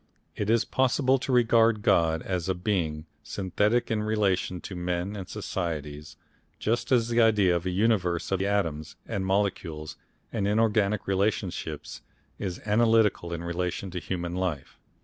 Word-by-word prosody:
It 105 Hz, -, -2 dB
is 115 Hz, 0 st, +3 dB
possible 130 Hz, +1 st, +2 dB
to 135 Hz, -, -3 dB
regard 115 Hz, -3 st, +4 dB
God 80 Hz, -1 st, +3 dB
as 90 Hz, -1 st, -2 dB
a 95 Hz, -, +1 dB
Being 85 Hz, -5 st, -1 dB, 0.2 s
synthetic 105 Hz, +5 st, 0 dB
in 110 Hz, -1 st, +1 dB
relation 100 Hz, -4 st, 0 dB
to 95 Hz, -, -7 dB
men 90 Hz, +3 st, -2 dB
and 95 Hz, -3 st, -7 dB
societies, 75 Hz, -7 st, -4 dB, 0.4 s
just 115 Hz, +5 st, -1 dB
as 120 Hz, -2 st, +3 dB
the 120 Hz, 0 st, +3 dB
idea 105 Hz, -5 st, +4 dB
of 85 Hz, +1 st, -2 dB
a -, -, +1 dB
universe 90 Hz, -3 st, +1 dB
of 95 Hz, -1 st, +1 dB
atoms 90 Hz, -7 st, -1 dB
and 95 Hz, -, -2 dB
molecules 95 Hz, -6 st, -1 dB, 0.4 s
and 105 Hz, -4 st, 0 dB
inorganic 105 Hz, -1 st, +2 dB
relationships 95 Hz, -6 st, -2 dB, 0.4 s
is 90 Hz, -3 st, -4 dB
analytical 110 Hz, -4 st, +3 dB
in 85 Hz, 0 st, -4 dB
relation 90 Hz, +2 st, -3 dB
to 90 Hz, -, -3 dB
human 85 Hz, -1 st, -4 dB
life. 90 Hz, -6 st, -3 dB
95 Hz, 150 wpm, -27 LUFS, 85-110 Hz, 0.4 s, regard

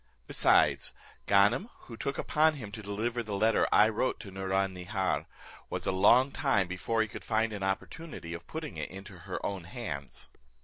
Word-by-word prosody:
Besides, -, -, +3 dB, 0.3 s
Ganem, 105 Hz, -, +4 dB
who 115 Hz, -, -10 dB
took 140 Hz, +5 st, -3 dB
upon 155 Hz, 0 st, +3 dB
him 110 Hz, -8 st, -7 dB
to 110 Hz, -, -7 dB
deliver 110 Hz, +4 st, -2 dB
the 105 Hz, -3 st, -4 dB
letter 110 Hz, +2 st, +3 dB
I 105 Hz, -, +7 dB
wrote 110 Hz, +3 st, -1 dB
to 100 Hz, -, -9 dB
Nouron 95 Hz, 0 st, 0 dB
Nihar, 95 Hz, +1 st, -2 dB, 0.4 s
was -, -, -3 dB
a -, -, +2 dB
long 120 Hz, +8 st, +5 dB
time 135 Hz, -, +1 dB
before 110 Hz, +5 st, 0 dB
he -, -, -4 dB
could -, -, -9 dB
find 110 Hz, 0 st, 0 dB
an 100 Hz, -, -5 dB
opportunity 95 Hz, -, -4 dB
of 85 Hz, 0 st, -8 dB
putting 160 Hz, -2 st, -6 dB
it -, -, -4 dB
into 95 Hz, +1 st, -10 dB
her 90 Hz, 0 st, -5 dB
own 95 Hz, -4 st, -3 dB
hands." 80 Hz, -, -6 dB
105 Hz, 180 wpm, -30 LUFS, 95-120 Hz, 0.4 s, I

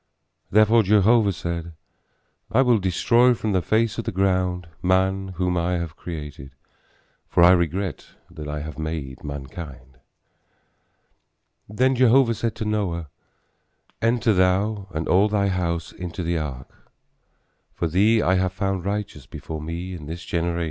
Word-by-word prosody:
Therefore 110 Hz, +3 st, +5 dB
Jehovah 105 Hz, +1 st, +4 dB
said, 85 Hz, -1 st, -5 dB, 0.8 s
I 130 Hz, +5 st, +4 dB
will 120 Hz, -4 st, +3 dB
destroy 115 Hz, +7 st, +3 dB
from 110 Hz, -2 st, -2 dB
the 95 Hz, -2 st, +2 dB
face 110 Hz, +5 st, +1 dB
of 115 Hz, -, -4 dB
the -, -, -2 dB
ground 90 Hz, -2 st, 0 dB
man 95 Hz, +1 st, +1 dB
whom 90 Hz, 0 st, 0 dB
I 85 Hz, +1 st, 0 dB
have 85 Hz, -2 st, -3 dB
created, 75 Hz, -6 st, -8 dB, 0.7 s
for 85 Hz, -, +4 dB
I 90 Hz, -, +8 dB
regret 90 Hz, 0 st, 0 dB, 0.2 s
that 80 Hz, -3 st, -8 dB
I 75 Hz, 0 st, -4 dB
have 80 Hz, +1 st, -7 dB
made 80 Hz, -4 st, -5 dB
mankind. 70 Hz, -2 st, -8 dB, 1.7 s
Then 130 Hz, +5 st, +2 dB
Jehovah 125 Hz, 0 st, +4 dB
said 115 Hz, 0 st, -3 dB
to 110 Hz, -, -4 dB
Noah, 90 Hz, -7 st, -2 dB, 0.9 s
enter 115 Hz, -1 st, +2 dB
thou 95 Hz, +2 st, +1 dB
and 80 Hz, -2 st, -4 dB
all 100 Hz, +4 st, +4 dB
thy 100 Hz, -1 st, +1 dB
house 85 Hz, -3 st, -2 dB
into 90 Hz, 0 st, -6 dB
the 85 Hz, 0 st, 0 dB
ark; 65 Hz, -4 st, -8 dB, 0.8 s
for 85 Hz, -, -1 dB
thee 105 Hz, +7 st, +3 dB
I 90 Hz, -, +3 dB
have 95 Hz, 0 st, 0 dB
found 95 Hz, -1 st, -2 dB
righteous 100 Hz, -9 st, -4 dB
before 80 Hz, +4 st, -7 dB
me 85 Hz, +4 st, -5 dB
in 80 Hz, -5 st, -8 dB
this 85 Hz, +3 st, -7 dB
generation. 85 Hz, 0 st, -1 dB
90 Hz, 145 wpm, -23 LUFS, 85-105 Hz, 1.7 s, I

